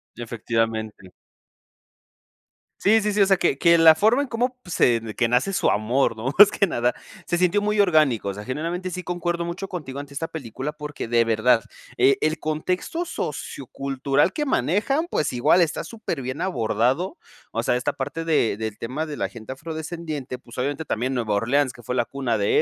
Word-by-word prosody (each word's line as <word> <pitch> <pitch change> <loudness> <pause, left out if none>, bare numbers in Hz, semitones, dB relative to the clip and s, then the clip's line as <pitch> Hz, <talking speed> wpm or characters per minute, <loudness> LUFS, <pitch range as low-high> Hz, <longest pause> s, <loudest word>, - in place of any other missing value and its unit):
Efectivamente. 115 -4 -3 1.7
Sí, 220 +3 +4
sí, 210 0 0
sí, 205 0 +1
o - - +7
sea, 195 -1 +4
que 155 -6 +1
que 170 +3 +5
la 160 -1 +8
forma 225 - +3
en 285 - -2
como 245 +2 -1
pues, 180 - -6
se 120 -2 +4
de 110 -1 -8
que 120 - +2
nace 125 +11 +1
su 195 - +2
amor, 115 +4 +1
¿no?, 115 +4 -3
más 205 0 +9
que 200 - +2
nada, 120 -6 0 0.3
se 175 - 0
sintió 180 +3 +3
muy 210 +1 0
orgánico, 155 - +3
o 100 - -3
sea, 105 - -8
generalmente, 170 +7 -3
sí 180 - -4
concuerdo 175 -1 -2
mucho 185 +3 -5
contigo 150 -8 -6
ante 145 0 -9
esta 165 +4 -3
película, 135 -1 -5
porque 150 -4 -6
de 115 0 +3
verdad, 115 +1 +3 0.3
eh, 135 - +4
el 155 +1 +1
contexto 180 - -2
sociocultural 140 - -2
que 300 +6 -2
manejan, 245 - +1
pues 150 - -1
igual 150 +9 +4
está 165 -1 0
superbién 145 - -5
abordado. 130 - 0 0.3
O 115 - -2
sea, 125 - +2
esta 130 +4 -1
parte 145 +4 -4
de 150 -10 +2
del 110 -1 -4
tema 140 +7 -4
de 150 -2 -6
la - - -1
gente 115 +2 -8
afrodescendiente, 155 -2 -6
pues 120 -1 -15
obviamente 145 +4 -2
también 130 +4 -1
Nueva 115 -4 -1
Orleans 125 +5 +1
que 120 - -14
fue 125 +2 -4
la 120 - +1
cuna 130 -5 -2
de 100 0 +3
145 Hz, 190 wpm, -23 LUFS, 120-175 Hz, 1.7 s, más